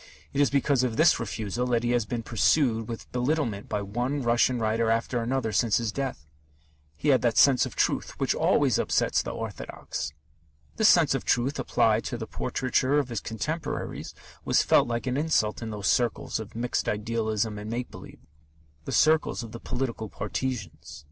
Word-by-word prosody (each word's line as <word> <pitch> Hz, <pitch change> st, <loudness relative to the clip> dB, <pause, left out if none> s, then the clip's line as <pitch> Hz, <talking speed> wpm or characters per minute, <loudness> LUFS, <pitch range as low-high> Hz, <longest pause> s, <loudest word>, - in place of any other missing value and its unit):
It 140 Hz, -, +2 dB
is 145 Hz, -, +4 dB
because 140 Hz, -1 st, +2 dB
of 120 Hz, -3 st, -1 dB
this 165 Hz, +1 st, +5 dB
refusal 115 Hz, +1 st, -3 dB
that 120 Hz, -1 st, +1 dB
he 120 Hz, -, +1 dB
has 120 Hz, -3 st, +1 dB
been 120 Hz, -2 st, -3 dB
pursued 115 Hz, +1 st, +2 dB
with 115 Hz, -, -7 dB
belittlement 125 Hz, -5 st, -1 dB
by 105 Hz, -1 st, -2 dB
one 125 Hz, +7 st, -2 dB
Russian 120 Hz, +1 st, +2 dB
writer 110 Hz, 0 st, 0 dB
after 115 Hz, +2 st, 0 dB
another 120 Hz, -1 st, -1 dB
since 105 Hz, +1 st, +2 dB
his 115 Hz, -2 st, -1 dB
death. 130 Hz, -, -4 dB, 0.7 s
He 150 Hz, -, 0 dB
had 130 Hz, -3 st, +4 dB
that 115 Hz, -2 st, +1 dB
sense 135 Hz, -3 st, +5 dB
of -, -, -11 dB
truth -, -, -1 dB
which -, -, +1 dB
always -, -, +2 dB
upsets -, -, +1 dB
the -, -, -5 dB
orthodox. -, -, -5 dB, 0.7 s
This 220 Hz, -, +5 dB
sense 165 Hz, -6 st, +5 dB
of 135 Hz, -, -2 dB
truth 135 Hz, +4 st, +1 dB
applied 115 Hz, -3 st, +2 dB
to 120 Hz, -, -3 dB
the 115 Hz, -, -5 dB
portraiture 130 Hz, +4 st, 0 dB
of 140 Hz, -3 st, 0 dB
his 115 Hz, -3 st, -2 dB
contemporaries 145 Hz, +8 st, -4 dB, 0.3 s
was -, -, +3 dB
felt -, -, +4 dB
like 120 Hz, -1 st, -2 dB
an 130 Hz, 0 st, -1 dB
insult 145 Hz, -9 st, +1 dB
in 115 Hz, -, -4 dB
those 105 Hz, -2 st, -5 dB
circles 120 Hz, -1 st, +1 dB
of 110 Hz, 0 st, -9 dB
mixed 120 Hz, +2 st, -1 dB
idealism 110 Hz, 0 st, -1 dB
and 105 Hz, +1 st, -7 dB
make 120 Hz, +2 st, -4 dB
believe, -, -, -12 dB, 0.6 s
the -, -, -5 dB
circles 155 Hz, -5 st, +3 dB
of 115 Hz, -, -9 dB
the 115 Hz, -, -8 dB
political 120 Hz, -4 st, -4 dB
partisans. 105 Hz, -, -5 dB
120 Hz, 180 wpm, -27 LUFS, 110-130 Hz, 0.7 s, this